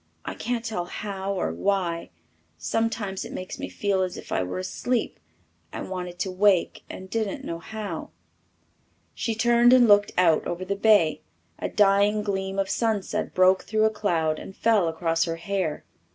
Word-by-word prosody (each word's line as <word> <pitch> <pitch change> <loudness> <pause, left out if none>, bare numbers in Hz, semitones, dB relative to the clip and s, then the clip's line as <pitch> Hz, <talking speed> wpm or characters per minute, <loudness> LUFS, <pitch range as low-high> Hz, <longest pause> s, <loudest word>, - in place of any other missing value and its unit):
I - - -4
can't 235 0 -3
tell 215 -6 -2
how 195 +1 -4
or 185 - -1
why. 180 -4 -1 0.5
Sometimes 205 - -2
it - - -8
makes 185 - -6
me - - -4
feel 200 -2 0
as 185 -1 -2
if - - -10
I - - +1
were 90 - -4
asleep 225 +6 -2 0.5
and - - -6
wanted 180 -1 -5
to 190 - -1
wake 190 -1 +2
and 190 - -8
didn't 215 -1 -3
know 165 - -4
how." 205 -3 -6 1.0
She 225 - -2
turned 240 +2 +5
and 250 -2 +6
looked 205 -1 +5
out 170 -3 +3
over 175 +2 -4
the 200 +1 -1
bay. 195 -8 +4 0.4
A - - -2
dying 205 +1 +3
gleam 195 -1 -2
of 195 -1 +1
sunset 220 -2 -1
broke 185 +1 +4
through 215 0 +2
a 220 - +3
cloud 165 -7 0
and 190 - -10
fell 220 -6 +3
across 165 0 0
her 165 -1 -2
hair. 170 -2 -3
195 Hz, 170 wpm, -25 LUFS, 180-215 Hz, 1.0 s, and